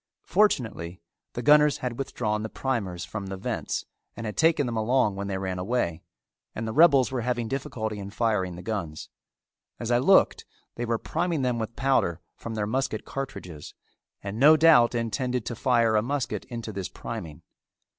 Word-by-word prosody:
Fortunately 110 - +1 0.3
the 120 - -4
gunners 150 0 +6
had 125 -1 -4
withdrawn 105 -5 -2
the 110 - -4
primers 100 -11 -3
from 100 +3 -6
the 95 0 -5
vents 95 - -3 0.3
and 115 - -5
had 105 - -4
taken 160 -3 +3
them 120 -1 -3
along 110 0 +2
when 100 0 -4
they 95 -1 -2
ran 95 -1 -3
away 90 -5 -1 0.5
and 115 - -3
the 110 - -3
rebels 140 -4 +5
were 130 -2 -1
having 120 -1 -1
difficulty 110 -4 -3
in 100 0 -6
firing 105 -5 0
the 90 - -9
guns. 90 -9 -4 0.7
As 120 0 -3
I 120 - +4
looked 190 +9 +4 0.3
they 120 - -4
were 115 -1 0
priming 165 +2 -1
them 125 -2 0
with 110 +1 -4
powder 130 -10 +1 0.2
from 115 -1 -7
their 105 -1 -1
musket 115 0 -2
cartridges, 90 - -7 0.5
and 100 +2 -5
no 155 +4 +7
doubt 150 -7 +6
intended 125 +1 -1
to 120 - -4
fire 115 -2 +2
a 105 - +4
musket 135 +2 -2
into 115 -3 -6
this 95 -3 -4
priming. 75 -3 -7
115 Hz, 175 wpm, -26 LUFS, 100-130 Hz, 0.7 s, no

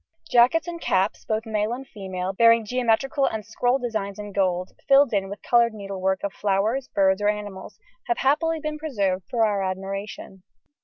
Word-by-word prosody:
Jackets 250 +8 +4
and 340 -1 -6
caps, 190 +2 0
both 220 +1 -2
male 215 0 -1
and 265 +2 -7
female, 190 -2 -5
bearing 230 +2 +5
geometrical 255 +5 +1
and 220 -2 -4
scroll 245 +3 +1
designs 215 -6 -4
in 205 -1 -7
gold, 185 -2 0 0.2
filled 275 -3 +5
in 195 -1 0
with 200 0 -8
coloured 235 -2 +3
needlework 190 -2 -2
of 200 -1 -3
flowers, 210 +7 0
birds, 190 0 +2
or 205 - +3
animals 205 -2 -5 0.3
have 355 - 0
happily 325 +4 +1
been 305 0 -4
preserved 200 - -1
for 230 -2 +2
our 205 -2 0
admiration. 195 0 -5
215 Hz, 170 wpm, -24 LUFS, 195-250 Hz, 0.3 s, bearing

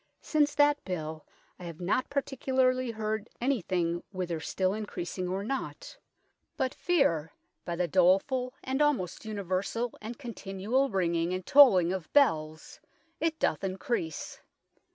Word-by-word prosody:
Since 295 -2 +2
that 290 0 +4
bill 160 -4 -5 0.3
I 180 - -8
have 170 -1 -8
not 190 +8 0
particularly 260 -2 +1
heard 220 -1 -3
anything 180 -9 0
whither 180 -4 -3
still 185 +4 -1
in 215 0 -4
creasing 180 0 -4
or 190 +2 -2
not, 275 - -5 0.6
but 260 - 0
feare, 165 - +1 0.3
by 170 - -3
the 175 0 0
dolefull 195 - +2
and 265 +2 -1
almost 250 - 0
universall 205 +3 -2
and 225 +2 -6
continuall 235 +1 -1
ringing 170 -3 0
and 185 - -5
tolling 190 -12 +7
of 185 -5 -5
bells 155 - +2 0.4
it 320 0 0
doth 160 - 0
increase. 185 -4 -3
200 Hz, 130 wpm, -29 LUFS, 175-260 Hz, 0.6 s, tolling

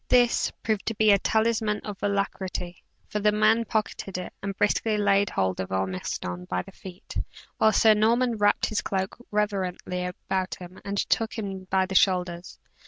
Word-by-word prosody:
"This" 245 -1 +4
proved 215 -3 -1
to 225 - -1
be 215 0 +5
a 200 - +5
talisman 220 0 +1
of 205 -2 -7
alacrity; 195 -3 -2 0.2
for 210 - -2
the 210 0 +3
man 215 +2 +3
pocketed 210 -3 -2
it, 180 - -6
and 195 0 -4
briskly 210 +1 +1
laid 200 -1 +3
hold 95 -1 -1
of 95 - -4
Ormiston 90 -1 -3
by 90 0 -2
the - - -13
feet, 185 -1 -11 0.4
while 220 - +5
Sir 215 +1 +6
Norman 230 +3 +2
wrapped 205 0 +3
his 215 - -1
cloak 190 0 -2
reverently 190 -3 -1
about 185 +1 -3
him 180 +1 -11
and 200 0 -4
took 225 +3 0
him 195 -3 -5
by 190 0 +2
the 190 - -6
shoulders. 180 -2 +1
200 Hz, 170 wpm, -26 LUFS, 185-215 Hz, 0.4 s, Sir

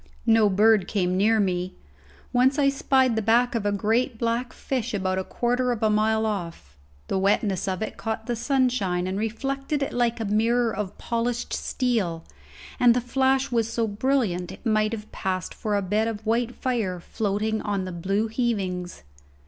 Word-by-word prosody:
No 225 -2 +5
bird 205 0 +4
came 180 -3 0
near 215 +4 +3
me. 185 -2 -1 0.6
Once 260 +3 +3
I 280 -2 +4
spied 265 -3 +2
the 220 - +1
back 235 +3 +3
of 220 -3 -1
a - - +2
great 225 +4 0
black 235 +2 -1
fish 250 -5 -3
about 185 -1 -1
a - - -2
quarter 245 +4 0
of 230 -2 -3
a 215 - +3
mile 220 +1 +2
off. 170 - -4 0.3
The 190 - 0
wetness 195 -1 +1
of 190 +2 -1
it - - -6
caught 220 -1 -4
the 240 - -1
sunshine 240 -8 +1
and 190 +2 -2
reflected 275 +6 -2
it - - -4
like 240 -1 +1
a 225 - -2
mirror 230 +3 +1
of 205 -2 -4
polished 235 +1 -2
steel, 205 -11 -1 0.5
and 240 -1 +6
the - - +3
flash 265 +2 +1
was 230 -2 0
so 230 - 0
brilliant 210 -5 0
it - - -12
might 215 -1 +2
have 215 -1 -7
passed 185 -1 -3
for 210 -2 -2
a 200 - -1
bed 210 +4 +1
of 220 -1 -5
white 235 +2 0
fire 220 -8 -1
floating 215 +4 -2
on 200 -3 -2
the 185 - -5
blue 195 +5 -1
heavings. 195 - -2
220 Hz, 180 wpm, -25 LUFS, 195-240 Hz, 0.6 s, and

